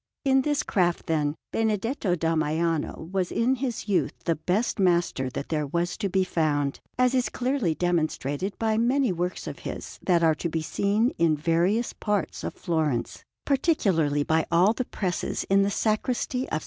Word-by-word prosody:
In 270 -1 +4
this 295 +1 0
craft, 175 - 0
then, 150 -2 0 0.2
Benedetto 220 -2 0
da 165 -1 0
Maiano 160 0 -1
was 190 -2 -1
in 240 +3 +2
his 245 -4 -3
youth 200 -3 +1
the 165 - +3
best 195 +9 -1
master 170 -8 +2
that 140 - -6
there 150 -2 -1
was 170 +4 -1
to 205 -3 -1
be 190 +1 +2
found, 145 -5 0 0.2
as 250 0 +3
is 255 -1 +1
clearly 250 - 0
demonstrated 170 0 -1
by 220 -1 +1
many 250 0 +2
works 180 +1 -3
of - - -6
his - - -7
that 175 -2 +2
are 160 -1 +5
to 160 +3 -3
be 160 0 -2
seen 205 +8 +1
in 165 -2 +3
various 175 +9 +1
parts 210 -2 -2
of - - -4
Florence, 155 -8 -1 0.2
particularly 190 - +2
by 160 +2 +2
all 180 +6 +4
the 255 +2 -3
presses 185 -6 -2
in 195 0 +5
the 200 - +2
Sacristy 235 +5 -1
of - - -8
S. 155 - +1
180 Hz, 175 wpm, -26 LUFS, 160-225 Hz, 0.2 s, are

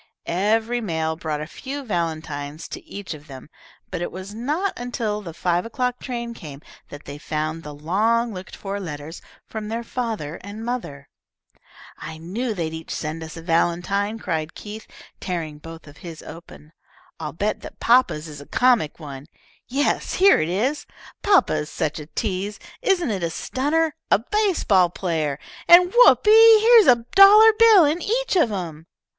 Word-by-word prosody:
Every 220 +6 0
mail 160 -5 -2
brought 155 -2 -4
a - - -4
few 275 - -7
valentines 160 - -4
to - - -8
each 200 -4 -7
of 150 0 -13
them, 135 +1 -12 0.4
but 180 -2 -4
it 175 - -3
was 190 +3 -8
not 300 - -2
until 225 -4 -3
the 175 -5 -8
five 175 +1 -1
o'clock 250 +1 -2
train 235 -2 -5
came 150 -10 -10 0.3
that 145 0 -11
they 145 +1 -8
found 155 +2 -3
the 150 -2 -9
long 220 +9 0
looked 185 0 -9
for 200 0 -5
letters 160 -2 -7 0.2
from 215 -1 -6
their 230 +2 -4
father 225 - -4
and 210 +3 -8
mother. 190 - -5 0.9
"I 160 - -8
knew 210 +8 -4
they'd 160 -3 -3
each 160 0 -8
send 155 +1 -4
us 160 +1 -9
a 165 - -9
valentine," 175 +5 0
cried 160 -7 -4
Keith, 215 +1 -9 0.3
tearing 160 -5 -4
both 165 +1 -11
of 145 0 -15
his 165 -3 -10
open. 165 -2 -13 0.5
"I'll 155 -2 -5
bet 205 +8 -2
that - - -11
papa's 230 -10 +2
is 145 -2 -10
a 145 - -13
comic 240 -13 +2
one. 140 -2 -9 0.4
Yes, 280 +3 -1
here 390 +1 +5
it 155 - -1
is. 245 +11 -1 0.3
Papa 400 -2 +3
is 150 0 -2
such 155 -1 -3
a 150 - -9
tease. 200 +2 -3 0.2
Isn't 355 - +1
it 195 -3 -3
a 170 - -1
stunner? 295 - -1 0.2
a - - +5
base 395 - 0
ball 185 -3 +4
player. 160 -6 -2 0.3
And, 355 +1 +7
whoopee! 450 -2 +7
Here's 455 -1 +6
a 240 -3 +4
dollar 420 +3 +8
bill 440 -7 +7
in 310 +4 0
each - - -1
of 315 -11 +3
'em." 165 -5 -6
195 Hz, 170 wpm, -22 LUFS, 160-250 Hz, 0.9 s, dollar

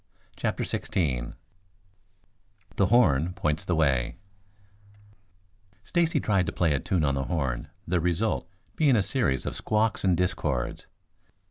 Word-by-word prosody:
CHAPTER - - -2
XVI 65 -9 -2 1.4
THE 100 - +3
HORN 90 - +3
POINTS 85 -1 -1
THE 90 - 0
WAY 65 -6 +1 1.7
Stacy 170 +3 +1
tried 95 -4 +1
to - - -1
play 85 -4 +1
a 70 - 0
tune 85 +2 0
on 70 - +1
the 70 -1 -1
horn, 65 -8 -2 0.2
the 90 +1 +1
result 90 +5 0 0.3
being 145 -5 +4
a 105 - +3
series 100 - 0
of - - -3
squawks 110 0 0
and 90 -3 +3
discords. 75 -9 -1
90 Hz, 130 wpm, -27 LUFS, 70-100 Hz, 1.7 s, being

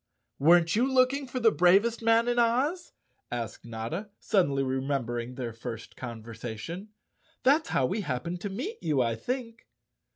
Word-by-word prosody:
"Weren't 165 +4 +5
you 250 +5 +2
looking 265 +2 +3
for 255 +1 -3
the 225 -2 +5
bravest 200 +7 +4
man 230 +1 +4
in 240 0 +2
Oz?" 275 +10 +1 0.4
asked 115 -3 -4
Notta, 120 - -5
suddenly 140 -9 +1
remembering 130 -2 -2
their 120 -3 -4
first 115 0 -7
conver¬ 115 -2 -7
sation. 120 - -6 0.3
" - - -38
That's 290 +5 +4
how 130 - +2
we 200 - -1
happened 170 +3 -3
to 205 - -3
meet 305 - -5
you, 145 -5 +2
I 115 -1 0
think." 230 - -5
175 Hz, 160 wpm, -28 LUFS, -, 0.4 s, Weren't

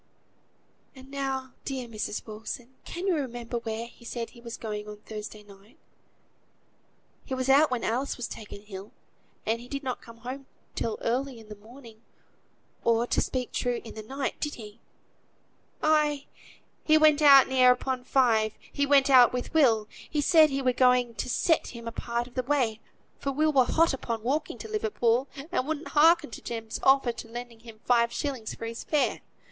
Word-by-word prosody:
"And 265 +1 -14
now, 270 -2 -3
dear 260 -3 -4
Mrs. 215 -2 -4
Wilson, 225 +3 -7
can 350 +2 -5
you 385 - +3
remember 240 -4 -3
where 225 0 -4
he 235 - -16
said 235 -1 -5
he 235 - -15
was 235 -1 -7
going 210 -2 -5
on 210 0 -8
Thursday 215 0 -8
night? 200 +2 -18 1.5
He 265 - -4
was 260 0 -2
out 285 +3 +6
when 250 -2 -2
Alice 255 +5 -1
was 245 - -3
taken 205 -1 -9
ill; 195 -1 -9 0.5
and 230 +2 0
he 245 - -11
did 275 +2 -5
not 255 -2 -3
come 230 0 -13
home 260 +4 -7 0.3
till 225 -2 -2
early 255 +1 -1
in 220 -1 -15
the 210 - -8
morning, 225 +1 -15 0.8
or, 230 0 +3
to - - +1
speak 255 -2 -2
true, 245 -1 -1
in 225 - -9
the 220 - -7
night: 270 +5 -4
did 295 -1 -3
he?" 215 -1 -11 1.0
"Ay! 300 -2 +2 0.6
he 310 0 +5
went 310 -1 +5
out 275 -3 +8
near 255 -1 +5
upon 250 0 -1
five; 230 -5 +2 0.2
he 285 -1 +1
went 275 -1 +5
out 255 -3 +7
with 250 +3 -4
Will; 230 -9 +4 0.2
he 300 - -1
said 310 +1 +6
he 275 -1 -2
were 255 -1 +2
going 250 -1 +3
to 225 - -4
set 325 +6 +2
him 230 0 -9
a - - -3
part 235 +1 -3
of 245 - -15
the 255 - 0
way, 250 -5 0 0.4
for 275 - -2
Will 305 +3 +1
were 260 -3 +5
hot 330 +2 +3
upon 230 -4 -4
walking 280 +6 -1
to - - -8
Liverpool, 285 - +1 0.2
and 285 -7 0
wouldn't 315 0 -3
hearken 320 -2 +4
to - - -8
Jem's 225 -2 -5
offer 270 -2 +4
of 230 - -8
lending 235 0 -8
him 225 -1 -14
five 235 -1 +3
shilling 255 -4 -4
for 230 - -5
his 230 0 -6
fare. 300 -2 0
250 Hz, 185 wpm, -27 LUFS, 230-275 Hz, 1.5 s, out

